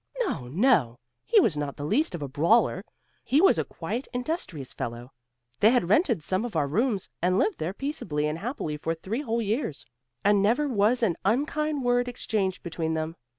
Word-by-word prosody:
"No, 140 - -2
no! 155 - +2 0.3
he 455 - +6
was 210 - +3
not 145 -1 -3
the 145 - -4
least 285 - +1
of 160 - -5
a - - -3
brawler; 165 - +2 0.4
he 280 - +2
was 385 - +5
a - - +1
quiet 245 +4 -5
industrious 245 - -4
fellow. 120 +2 -6 0.5
They 215 - +6
had 235 -8 +2
rented 225 - +3
some 185 +6 -1
of 240 -6 -5
our 150 -3 +2
rooms, 210 - 0
and 180 +2 +2
lived 410 - +1
there 165 - -2
peaceably 195 - -3
and 150 +2 -2
happily 200 - -4
for 165 +2 -2
three 205 - -4
whole 230 -4 -1
years, 210 - -2 0.4
and 205 -1 +5
never 240 +9 +2
was 235 0 +2
an 185 -7 +2
unkind 290 +6 0
word 245 0 +2
exchanged 205 -6 -2
between 165 -1 -2
them. 160 +1 -3
205 Hz, 190 wpm, -27 LUFS, 160-250 Hz, 0.5 s, he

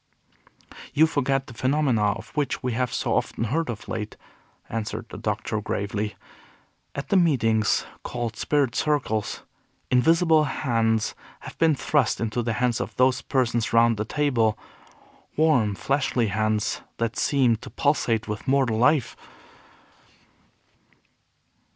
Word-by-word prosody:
"You 155 +2 +6
forget 135 -3 0
the 125 - -11
phenomena 130 -5 +1
of 115 - -10
which 145 -4 -2
we 125 - 0
have 125 +1 -1
so - - -1
often - - -1
heard 155 +8 -1
of 115 -3 -6
late," 110 -1 -5 0.5
answered 110 0 -4
the - - -8
Doctor, 105 0 -2
gravely. 105 0 -3 0.8
"At 140 - -5
the - - +2
meetings 115 - +2 0.2
called 115 -2 -4
'spirit 140 -2 +1
circles,' 130 -9 -1 0.5
invisible 160 +4 +4
hands 115 -5 0 0.3
have - - -9
been 160 -2 +4
thrust 140 -3 +1
into 115 +1 -1
the 115 -1 -1
hands 120 0 0
of - - -5
those 130 0 +3
persons 120 -4 0
round 115 -1 +4
the 105 - -1
table, 115 -5 +1 0.8
warm, 135 -10 +3
fleshly 130 -2 0
hands 110 +1 0 0.2
that 115 0 -1
seemed 125 -6 +2
to - - -9
pulsate 115 -6 0
with 105 +5 -5
mortal 130 -5 +2
life." 125 +1 +3
120 Hz, 130 wpm, -25 LUFS, 110-140 Hz, 0.8 s, You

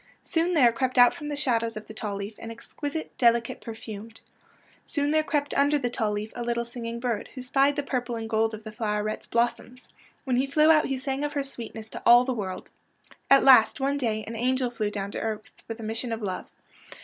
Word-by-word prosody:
Soon 340 +2 0
there 250 -6 +6
crept 255 +2 -2
out 245 0 +7
from 295 -3 -7
the 295 - -3
shadows 230 -6 0
of 215 - -7
the 220 - -10
tall 210 -2 -4
leaf 200 +2 -5
an 225 - -7
exquisite, 285 +7 -6
delicate 235 -1 +2
perfume. 220 -1 -8 0.7
Soon 290 0 -1
there 310 0 +4
crept 290 -1 -1
mider 285 +1 +3
the 245 -4 -2
tall 220 -3 -1
leaf 210 +1 -4
a 240 - -5
little 235 0 -1
singing 235 -1 -6
bird, 235 -4 -2
who 255 - -6
spied 275 +2 +2
the 290 - -1
purple 245 -3 -2
and 225 -1 -4
gold 220 0 +1
of 215 - -12
the 215 - -7
floweret's 210 -1 -2
blossoms. 240 +1 -2 0.3
When 255 -3 0
he 265 +2 +1
flew 305 +3 +5
out 305 -1 +4
he 270 - -1
sang 270 +2 -3
of 295 0 -2
her 285 - -1
sweetness 230 -4 -8
to - - -7
all 240 +1 +7
the 260 - -1
world. 195 -5 -5 0.6
At 275 0 +7
last, 250 -2 +7
one 280 +1 0
day, 220 -4 -1
an 230 - -6
angel 250 +1 0
flew 215 -3 -2
down 200 -1 -4
to - - -4
earth 215 -1 -3 0.2
with 225 0 -6
a - - -7
mission 225 +2 -4
of 225 -1 -4
love. 185 -2 -4
240 Hz, 225 wpm, -26 LUFS, 220-275 Hz, 0.7 s, out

